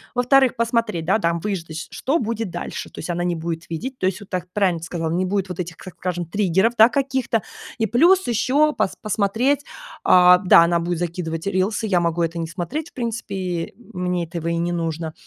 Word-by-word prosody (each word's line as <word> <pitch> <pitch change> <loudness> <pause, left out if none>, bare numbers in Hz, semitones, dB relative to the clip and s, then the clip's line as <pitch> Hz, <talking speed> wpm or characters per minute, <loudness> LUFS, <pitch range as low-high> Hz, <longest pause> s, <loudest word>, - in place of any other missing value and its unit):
Во-вторых, 255 +1 +4
посмотреть, 230 -7 0
да, 195 +5 +2
там 170 -3 0
выждать, 165 -5 -4
что 290 +6 0
будет 225 - -2
дальше. 175 - -6
То - - -11
есть 160 - -6
она 175 0 -1
не 175 -1 0
будет 165 +1 -5
видеть, 250 +11 -5
то - - -1
есть 190 +2 -1
вот 205 - -12
так 180 -1 -3
правильно 190 -5 +1
ты 165 - -7
сказала, 165 -1 -3
не 180 +2 0
будет 195 0 -1
вот 180 - -6
этих, 175 -1 -4
как 185 +1 -11
скажем, 175 -1 -3
триггеров, 190 +5 +1
да, 220 +1 +9
каких-то. 265 -4 0 0.4
И 225 - +2
плюс 345 - +4
еще 260 +6 +2
пос 215 -3 -1
посмотреть, 225 +8 0 0.4
а, 180 0 +7
да, 180 -3 +6
она 170 0 +2
будет 170 0 -2
закидывать 170 -1 -3
рилсы. 200 +3 0
Я 185 -5 +2
могу 170 0 0
это 165 +1 -2
не 165 - -2
смотреть 180 - -5
в - - -50
принципе. 230 -5 -4
И 175 -3 -3 0.2
мне 180 -1 -1
этого 165 0 -5
и 170 0 0
не 170 +1 -1
нужно. 165 -2 -3
185 Hz, 210 wpm, -22 LUFS, 170-225 Hz, 0.4 s, да